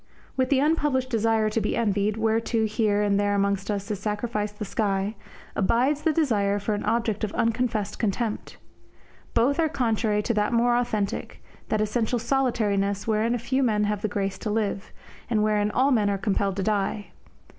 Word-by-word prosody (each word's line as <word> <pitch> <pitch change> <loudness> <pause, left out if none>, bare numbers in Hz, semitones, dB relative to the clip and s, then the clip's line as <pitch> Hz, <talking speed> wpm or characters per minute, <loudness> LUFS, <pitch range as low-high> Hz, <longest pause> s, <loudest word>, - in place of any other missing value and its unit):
With 260 -1 +1
the 275 - +3
unpublished 285 -3 +1
desire 225 -1 +2
to 225 - 0
be - - -1
envied, 210 -2 +1
whereto 225 0 +1
here 210 -1 +1
and 200 -1 +2
there 205 0 +1
amongst 200 0 0
us 200 0 -2
is 205 - -3
sacrificed 210 0 -3
the 210 - -4
sky, 200 -1 -1 0.4
abides 255 +9 +2
the 320 - +2
desire 215 -11 +1
for 205 +1 -2
an 205 - -3
object 225 -1 0
of 210 - -1
unconfessed 225 -3 -1
contempt. 220 +1 -2 0.8
Both 280 +6 +2
are 320 -1 +3
contrary 225 -6 0
to 235 - 0
that 210 +2 0
more 240 +1 +3
authentic, 215 -5 -2 0.3
that 215 - +1
essential 220 +3 0
solitariness 210 -6 0
wherein 225 +2 +1
a - - 0
few 260 +3 -1
men 215 -5 +2
have 210 -1 -1
the 215 - 0
grace 200 -2 -3
to 215 - -4
live, 210 -1 -2 0.4
and 215 -3 +2
wherein 210 -1 +2
all 260 +6 +2
men 215 -5 +3
are 200 - 0
compelled 195 -1 0
to 195 - -2
die. 205 0 -1
215 Hz, 180 wpm, -25 LUFS, 205-235 Hz, 0.8 s, the